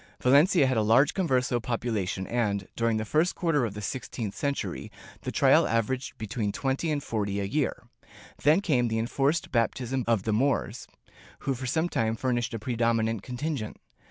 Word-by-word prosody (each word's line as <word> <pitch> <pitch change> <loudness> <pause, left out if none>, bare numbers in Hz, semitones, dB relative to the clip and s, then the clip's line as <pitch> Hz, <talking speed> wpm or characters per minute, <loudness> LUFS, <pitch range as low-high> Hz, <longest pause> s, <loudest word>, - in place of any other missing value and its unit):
Valencia 145 +5 +5
had 130 -2 +1
a - - +3
large 120 +8 +4
converso 130 -9 +1
population 110 -5 -2
and, 100 -5 -1
during 115 -1 +1
the 110 - -2
first 155 +10 +1
quarter 155 -7 +1
of 105 -3 -5
the 105 - -6
sixteenth 115 -3 -4
century, 140 -1 -3 0.3
the - - -4
trials - - +4
averaged 115 +3 -1
between 110 -1 -2
thirty 135 +8 -1
and 145 -2 -1
forty 100 -4 -2
a - - -1
year. 140 +9 -1 0.6
Then 155 +7 +4
came 130 -11 +2
the 110 -1 -1
enforced 135 +7 0
baptism 125 +2 0
of 115 -5 +2
the 110 - 0
Moors, 120 -1 0 0.5
who 135 - 0
for 130 0 -5
some 160 +6 +1
time 115 -8 0
furnished 120 -1 -1
a - - -1
predominant 115 -1 0
contingent. 125 -1 -4
120 Hz, 170 wpm, -27 LUFS, 110-140 Hz, 0.6 s, Valencia